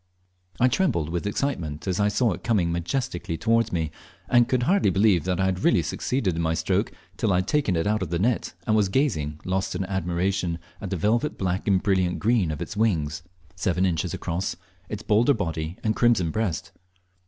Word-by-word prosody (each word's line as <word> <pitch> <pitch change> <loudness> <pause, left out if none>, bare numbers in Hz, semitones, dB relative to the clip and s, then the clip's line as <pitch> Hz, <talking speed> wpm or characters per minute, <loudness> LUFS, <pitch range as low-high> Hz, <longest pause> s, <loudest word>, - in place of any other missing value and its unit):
I 125 - +5
trembled 120 - +1
with 85 +4 -2
excitement 90 - -2
as 95 0 0
I 100 - +3
saw 110 +2 +2
it 85 - -6
coming 100 -8 +1
majestically 85 -1 -2
towards 115 +2 +2
me, 80 -3 -1 0.4
and 120 -1 +4
could 125 -2 +1
hardly 190 +9 +3
believe 95 -4 +3
I 90 +1 +1
had 95 -1 -1
really - - +4
succeeded 115 -10 -1
in 85 - -1
my 80 0 +1
stroke - - 0 0.3
till 110 - +1
I - - +3
had 90 +1 0
taken 140 -11 +1
it 80 - 0
out 105 0 +1
of 95 - -3
the 85 - 0
net 110 -1 0
and 110 - +2
was 105 -3 +3
gazing, 80 - 0
lost 95 0 -1
in 95 +1 -2
admiration, 90 -1 -1 0.2
at 100 - -4
the 95 - -2
velvet 115 - +1
black 95 +1 -2
and 95 -2 +3
brilliant 95 -3 +1
green 110 -5 +2
of 75 -2 -3
its - - -8
wings, 85 -9 0 0.3
seven 90 0 +1
inches 85 -4 0
across, 85 +3 -3 0.3
its 105 -1 -5
bolder 115 +6 +3
body, 80 -4 -3
and 110 -1 +1
crimson 115 -9 +3
breast. 105 -6 -2
95 Hz, 200 wpm, -25 LUFS, 85-110 Hz, 0.4 s, I